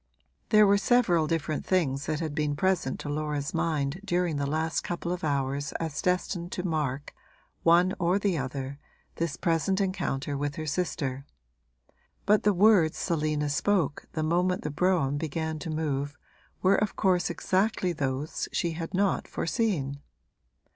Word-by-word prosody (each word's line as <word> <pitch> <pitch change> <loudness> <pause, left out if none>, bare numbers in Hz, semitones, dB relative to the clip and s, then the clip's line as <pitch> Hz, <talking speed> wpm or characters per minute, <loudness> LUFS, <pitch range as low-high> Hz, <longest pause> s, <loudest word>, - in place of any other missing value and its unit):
There 215 -1 +7
were 200 0 +4
several 195 -8 +3
different 155 -1 -1
things 145 -7 0
that 155 +1 -1
had 155 -3 -3
been 150 -1 0
present 175 -4 0
to - - -7
Laura's 150 -1 -2
mind 160 -1 -1
during 175 -5 0
the 140 0 -1
last 160 +2 0
couple 175 0 -4
of 180 +1 -3
hours 140 -1 -1
as 160 -3 -3
destined 180 -1 -1
to 180 - -3
mark 145 -4 -2 0.5
one 175 +3 +4
or 175 +1 +2
the 200 -3 +1
other 135 0 -4 0.4
this 165 0 -2
present 175 +3 +1
encounter 145 -8 -1
with 145 0 -2
her 155 - -4
sister; 145 -4 -2 1.0
but 210 +1 +4
the 210 - +4
words 190 -4 +4
Selina 155 -3 0
spoke 150 +2 0
the 155 - -1
moment 180 +3 +1
the 150 - -2
brougham 155 -4 +1
began 160 0 -3
to 165 - -6
move 145 -2 -2 0.5
were 190 +1 +5
of 210 -1 -1
course 185 -2 +2
exactly 190 -1 0
those 140 0 -2
she 170 - 0
had 165 +2 -5
not 195 0 +1
foreseen. 165 - -1
160 Hz, 155 wpm, -28 LUFS, 145-180 Hz, 1.0 s, There